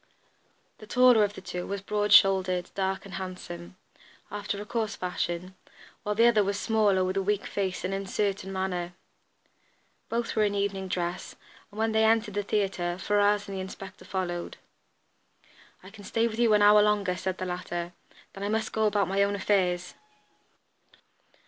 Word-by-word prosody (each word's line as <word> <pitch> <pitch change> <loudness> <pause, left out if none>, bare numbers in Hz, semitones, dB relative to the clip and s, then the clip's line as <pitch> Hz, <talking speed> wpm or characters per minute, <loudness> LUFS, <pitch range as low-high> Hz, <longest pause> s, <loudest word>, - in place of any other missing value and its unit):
The 215 - -12
taller 250 -2 +5
of 205 0 -1
the - - -9
two 180 0 -5
was 200 0 -3
broad 210 0 -1
shouldered, 190 -3 +5
dark 190 0 -2
and 195 - -10
handsome, 180 -2 -7 0.6
after 205 0 -4
a 205 - -6
coarse 220 -1 -2
fashion, 180 0 -3 0.5
while 210 0 -2
the 230 +2 +5
other 225 -3 +5
was 200 +1 -1
smaller, 205 -3 +2
with 185 +1 -2
a - - +2
weak 205 +1 0
face 190 -2 -3
and 190 - -2
uncertain 195 0 -2
manner. 180 -2 -3 1.2
Both 230 0 -2
were 220 - +2
in 205 -1 +1
evening 200 -1 -1
dress, 175 -1 -3 0.3
and 205 - -15
when 225 +1 +1
they 220 0 +3
entered 220 -1 +2
the 205 - 0
theatre 195 -4 -1
Ferrars 205 +1 +2
and 195 - -6
the 190 - -3
inspector 190 +1 -9
followed. 175 -2 -4 1.3
"I 185 - -12
can 205 -1 -13
stay 225 +3 +1
with 225 0 -5
you 230 -3 +5
an 205 - +4
hour 210 0 +7
longer," 205 -3 +2
said 185 0 -3
the 185 - -4
latter. 175 -1 -4 0.4
"Then 195 - -7
I 205 - -1
must 220 0 -1
go 220 -1 +2
about 205 -1 +1
my 195 +1 +1
own 200 0 +2
affairs." 180 -3 0
200 Hz, 175 wpm, -28 LUFS, 185-210 Hz, 1.3 s, hour